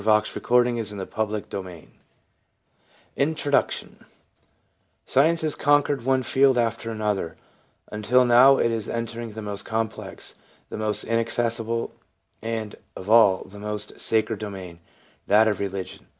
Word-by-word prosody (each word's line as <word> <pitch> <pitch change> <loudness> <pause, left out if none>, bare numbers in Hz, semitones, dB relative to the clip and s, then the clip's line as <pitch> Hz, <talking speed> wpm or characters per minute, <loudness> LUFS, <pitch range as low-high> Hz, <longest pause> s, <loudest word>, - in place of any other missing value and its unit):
408 110 0 +2
The - - -5
Psychology 120 -1 +2
of 105 -3 -6
Religion 110 -1 -1
CHAPTER 95 -2 -6
I - - -19 1.3
INTRODUCTION 145 -1 0 1.0
Science 160 +5 +3
has 155 -2 0
conquered 145 -3 +2
one 130 0 +2
field 135 0 +3
after 115 -1 -1
another, 105 -7 -2 0.6
until 115 +4 +3
now 125 +3 +7
it 115 - +2
is 110 -2 -3
entering 115 -1 -4
the 110 0 -7
most 100 -1 -5
complex, 110 -1 -4 0.4
the - - -6
most 110 -1 0
in 115 0 0
accessible, 115 0 -1 0.5
and, 110 -2 -4 0.2
of 100 +3 -5
all, 105 -5 +6
the 100 +2 -13
most 105 0 -5
sacred 110 -1 0
domain 95 -5 -7 0.2
— - - -33
that 110 +2 +5
of 105 - 0
religion. 95 -2 -5
110 Hz, 140 wpm, -24 LUFS, 105-120 Hz, 1.3 s, now